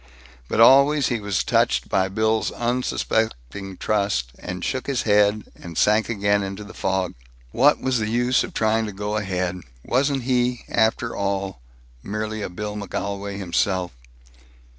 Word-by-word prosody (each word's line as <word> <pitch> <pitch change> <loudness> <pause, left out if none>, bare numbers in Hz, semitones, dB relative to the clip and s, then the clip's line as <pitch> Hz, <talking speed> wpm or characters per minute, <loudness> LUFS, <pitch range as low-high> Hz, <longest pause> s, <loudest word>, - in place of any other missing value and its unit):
But - - -2
always 140 +4 +6
he 120 - -1
was 100 -3 -1
touched - - +1
by 95 -1 +1
Bill's 110 +2 +1
unsuspecting 110 - -2
trust, 100 - 0
and 90 0 -5
shook 130 -1 -2
his 135 -3 0
head, 105 0 +3
and 85 -2 -10
sank 105 0 +3
again 100 -2 +1
into 100 +1 -5
the 105 - -11
fog. 95 -1 -1 0.4
What 145 +5 +4
was 130 -2 +1
the 110 -1 -1
use 120 +2 +2
of - - -6
trying 110 0 +1
to 105 - -6
go 105 +2 -3
ahead? 90 -3 -2 0.2
Wasn't 135 +1 +1
he, 125 -1 0
after 110 +1 +1
all, 100 -7 -2 0.4
merely 110 +3 -4
a - - -3
Bill 105 +3 -5
McGolwey 100 -1 -4
himself? 95 -1 0
105 Hz, 150 wpm, -23 LUFS, 95-115 Hz, 0.4 s, always